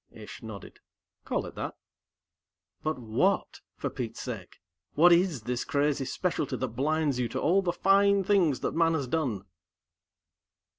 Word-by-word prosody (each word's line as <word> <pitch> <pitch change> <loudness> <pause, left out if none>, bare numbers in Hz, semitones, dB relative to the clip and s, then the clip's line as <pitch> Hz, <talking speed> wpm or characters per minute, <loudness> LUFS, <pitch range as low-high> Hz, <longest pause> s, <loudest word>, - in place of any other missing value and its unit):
Ish 110 -1 -11
nodded. 110 -3 -9 0.5
"Call - - -1
it - - -8
that." - - -5 1.1
"But 155 -1 -1
what, 115 -3 0
for - - -4
Pete's 115 -4 -5
sake? 110 -8 -7 0.4
What 175 +3 +7
is 170 - +3
this 125 +1 -2
crazy 145 -1 0
specialty 150 +1 -2
that 130 - -2
blinds 145 +2 0
you 125 - +1
to 130 +3 -3
all 180 +8 +3
the 180 -2 0
fine 195 +2 +4
things 180 -8 +2
that - - -1
man 165 0 +3
has 140 -4 -2
done?" 125 -9 -1
145 Hz, 150 wpm, -28 LUFS, 125-170 Hz, 1.1 s, What